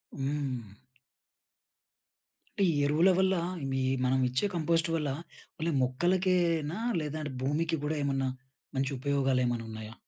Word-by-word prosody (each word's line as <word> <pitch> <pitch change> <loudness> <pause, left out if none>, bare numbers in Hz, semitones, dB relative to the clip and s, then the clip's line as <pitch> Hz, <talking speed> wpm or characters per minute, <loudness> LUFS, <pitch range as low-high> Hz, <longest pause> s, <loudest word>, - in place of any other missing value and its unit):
హ్మ్. 135 -7 -3 1.8
అంటే 200 - +5
ఈ - - 0
ఎరువుల 155 +6 +4
వల్ల 190 0 +3 0.4
మీ 135 0 0 0.2
మనమిచ్చే 130 +3 +2
కంపోస్ట్ 165 -1 +2
వల్ల 150 -3 -1 0.5
ఓన్లీ 165 0 -1
మొక్కలకేనా, 175 +3 +1 0.2
లేదంటే 150 -1 -4
భూమికి 160 +4 0
గూడా 155 +1 -1
ఏమన్నా 135 -1 0 0.5
మంచి 135 +1 0
ఉపయోగాలు 135 -1 +1
ఏమైనా 120 -1 -1
ఉన్నాయా? 110 0 -7
145 Hz, 115 wpm, -30 LUFS, 130-165 Hz, 1.8 s, అంటే